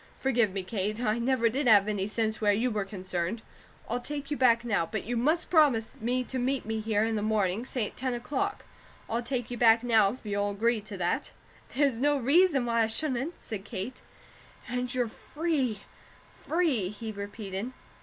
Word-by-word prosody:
"Forgive 240 -6 +2
me, 195 0 -3
Kate, 205 +2 -2
I 225 -1 0
never 240 -1 +2
did 260 +4 0
have 205 -3 +6
any 200 -2 -1
sense 220 0 -1
where 205 -1 +4
you 230 +5 +1
were 210 -2 -1
concerned! 185 +1 -3 0.4
I'll 240 +2 -1
take 285 +2 -5
you - - +1
back 240 -3 +4
now, 210 -7 +1
but 205 +5 -4
you 240 +3 -3
must 305 +9 +1
promise 285 -10 +4
me 250 +3 0
to 255 +1 -4
meet 260 +2 0
me 220 0 -2
here 215 -1 +1
in 225 0 0
the 210 - -1
morning, 215 +1 0
say 245 -5 -1
at - - -8
ten 255 -1 -2
o'clock. 295 +12 -3 0.4
I'll 230 +1 -1
take 245 -1 -3
you 245 - -3
back 225 0 +6
now, 220 -5 +4
if 255 - -12
you'll 205 0 0
agree 220 +3 +1
to 205 -1 -8
that." 175 -1 -1 0.4
"There's 270 -4 +2
no 290 +2 +3
reason 280 +1 +4
why 230 -1 +2
I 225 - +3
shouldn't," 270 +6 -1
said 205 -3 -6
Kate. 210 +4 -6 0.7
"And 250 0 -2
you're 250 -2 0
free, 270 -4 -2 0.5
free!" 300 - 0
he 220 +2 -6
repeated. 205 +1 -5
230 Hz, 195 wpm, -29 LUFS, 210-255 Hz, 0.7 s, have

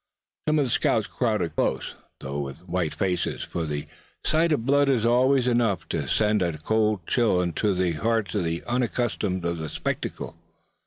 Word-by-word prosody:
Some 155 0 +3
of 145 - +3
the 125 - -3
scouts 110 -2 +2
crowded 105 - -1
close, - - -1 0.3
though 70 +2 -4
with 70 +5 -6
white 85 -3 -1
faces; 90 -3 -1
for 85 -2 -3
the 75 -1 -3 0.4
sight 160 +2 +3
of 120 -7 +1
blood 140 +1 +4
is 120 -4 +2
always 125 +2 +4
enough 120 -7 +1
to - - -2
send 105 -1 +2
a 85 -3 0
cold 105 +2 +1
chill 90 -7 +2
to 100 +4 0
the 90 -1 +1
hearts 110 +2 0
of 100 - 0
those 85 0 -2
unaccustomed 120 -6 -1
to 85 0 0
the 80 -2 -5
spectacle. - - -4
105 Hz, 175 wpm, -25 LUFS, 85-120 Hz, 0.4 s, blood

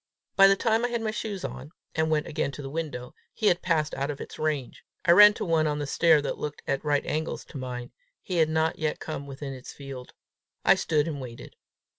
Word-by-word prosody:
By 195 0 +8
the 195 - +5
time 225 +2 +1
I - - +3
had 235 -1 -2
my 215 - 0
shoes 205 -3 -4
on, 145 - -7 0.2
and 160 0 +1
went 155 -1 +1
again 155 -2 -2
to 145 - -7
the 135 - -6
window, 145 -6 -4 0.2
he 220 - -3
had 175 -3 +4
passed 155 -4 +1
out 140 +2 -2
of 145 - -4
its - - -9
range. 150 -5 -2 0.2
I 170 - +6
ran 210 +3 +9
to - - -3
one 160 -3 +2
on 150 -1 -1
the 145 - -2
stair 155 +1 +4
that - - -3
looked 150 -1 -5
at 135 - -1
right 145 -1 +1
angles 155 +1 -3
to 145 - -8
mine: 125 -1 -6 0.3
he 180 - -3
had 160 -1 +4
not 160 0 0
yet 155 -1 -1
come 140 -3 -5
within 135 0 -6
its 130 -1 -10
field. 135 -3 -9 0.5
I - - +8
stood 155 -1 +1
and 145 -4 -4
waited. 120 -2 -9
155 Hz, 235 wpm, -27 LUFS, 140-170 Hz, 0.5 s, ran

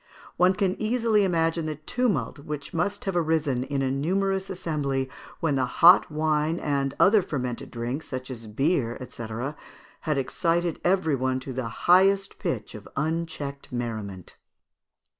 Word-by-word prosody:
One 185 +1 +4
can 195 -1 0
easily 220 -1 +2
imagine 165 -3 +1
the 155 - -2
tumult 205 - -1
which 145 -1 -6
must 200 +5 -1
have 195 -2 -1
arisen 155 -6 +1
in 135 0 -2
a 130 - 0
numerous 190 +7 0
assembly 140 -7 -2 0.3
when 160 -3 +1
the 130 -2 +1
hot 175 +5 +6
wine 155 +1 +1
and 140 -2 -1
other 205 +2 +6
fermented 125 -8 -4
drinks, 120 +6 -4
such 130 0 -5
as 115 -3 -8
beer, 125 +1 0
&c., 115 - -7 0.7
had 150 -2 -1
excited 165 +5 0
every 175 -5 +2
one 130 0 0
to 130 0 -6
the 125 -2 -3 0.2
highest 195 +2 +4
pitch 110 -4 -3
of 105 -1 -10
unchecked 155 -2 -3
merriment. 110 -7 -5
155 Hz, 145 wpm, -26 LUFS, 130-180 Hz, 0.7 s, hot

